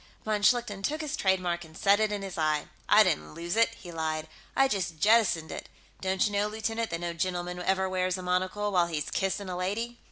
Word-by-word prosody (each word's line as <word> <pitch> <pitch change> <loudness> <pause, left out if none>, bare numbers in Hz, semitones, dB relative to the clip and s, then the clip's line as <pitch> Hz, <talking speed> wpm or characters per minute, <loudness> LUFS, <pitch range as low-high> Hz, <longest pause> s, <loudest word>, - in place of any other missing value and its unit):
Von 215 -1 0
Schlichten 225 -3 +2
took 305 +10 -1
his 305 -2 -3
trademark 180 -3 +1
and 160 0 -13
set 200 +1 +4
it 215 -1 +2
in 205 -1 -3
his 195 -2 -6
eye. 155 -2 +1 0.2
"I - - +8
didn't 75 0 -1
lose 170 +3 -3
it," 230 0 +5
he 175 - -10
lied. 160 -1 -2 0.3
"I 270 - +5
just 180 -8 -2
jettisoned 205 -7 +3
it. - - -7 0.3
Don't 190 0 +1
you 205 - -1
know, 205 +1 +2
lieutenant, 225 +1 -2
that 170 0 -3
no 170 0 -2
gentleman 180 +1 -2
ever 190 +1 +1
wears 185 0 0
a 185 - -7
monocle 185 +3 0
while 175 -3 +3
he's 155 -3 -3
kissing 195 +1 -1
a 180 - -4
lady?" 220 +7 -3
190 Hz, 220 wpm, -29 LUFS, 175-210 Hz, 0.3 s, I